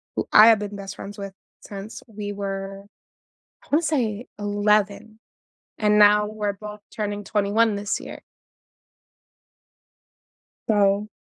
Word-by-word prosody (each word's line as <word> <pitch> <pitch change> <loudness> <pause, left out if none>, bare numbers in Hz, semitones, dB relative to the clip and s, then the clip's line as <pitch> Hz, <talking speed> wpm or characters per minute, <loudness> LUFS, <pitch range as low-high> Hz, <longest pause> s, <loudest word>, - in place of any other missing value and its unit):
who - - -2
I 215 +1 +9
have 225 -2 +6
been 205 0 -5
best 195 0 -7
friends 205 +1 -8
with 200 -1 -7 0.3
since 200 +1 -9
we 205 -2 -6
were, 195 0 -5 0.8
I - - -21
wanna 300 +3 +4
say 245 -7 -1
11, 205 +1 0 0.6
and 210 -1 +3
now 210 0 +6
we're 210 -1 -3
both 210 +1 -10
turning 205 -1 -4
21 210 +2 +1
this 200 0 -2
year. - - -10 2.5
So 205 -1 +2
205 Hz, 125 wpm, -23 LUFS, 200-215 Hz, 2.5 s, I